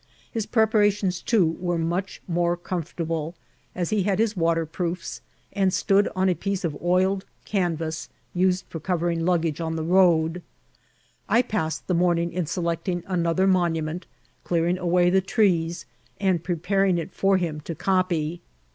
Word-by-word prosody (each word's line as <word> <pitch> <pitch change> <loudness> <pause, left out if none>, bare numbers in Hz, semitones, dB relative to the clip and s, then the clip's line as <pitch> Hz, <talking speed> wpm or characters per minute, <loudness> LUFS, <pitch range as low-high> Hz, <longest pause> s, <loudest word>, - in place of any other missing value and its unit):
His 225 -2 -3
preparations, 205 -5 +2
too, 180 -8 +2
were 175 -1 -1
much 175 +4 -2
more 175 0 +1
comfortable, 165 -2 -4 0.4
as 180 +2 -1
)ie 210 - +2
had 195 0 +1
his 220 0 +1
water 165 -1 +1
proofiB, 170 +2 -4 0.3
and 195 -1 +2
stood 200 +2 +3
on 190 0 +2
a 185 - +4
piece 195 +3 -3
of 160 -4 -1
oiled 185 +2 +2 0.2
canvass, 165 -5 -2 0.2
used 185 0 +1
for 165 - -6
covering 170 0 -1
luggage 165 -3 +1
on 160 0 -2
the 160 - -2
road. 170 -1 +3 0.9
I 230 +4 +4
passed 185 -9 -2
the 185 - 0
morning 170 -1 +2
in 175 -3 -2
selecting 170 +1 -2
another 180 0 +1
monument, 170 -2 0 0.4
clearing 175 +1 +1
away 175 0 +3
the 190 +1 +4
trees, 175 - +1 0.3
and 185 -4 +1
preparing 185 +2 +1
it 170 +2 -4
for 195 0 +3
him 160 -4 -3
to 165 +2 -6
copy. 175 -2 0
175 Hz, 150 wpm, -25 LUFS, 165-190 Hz, 0.9 s, a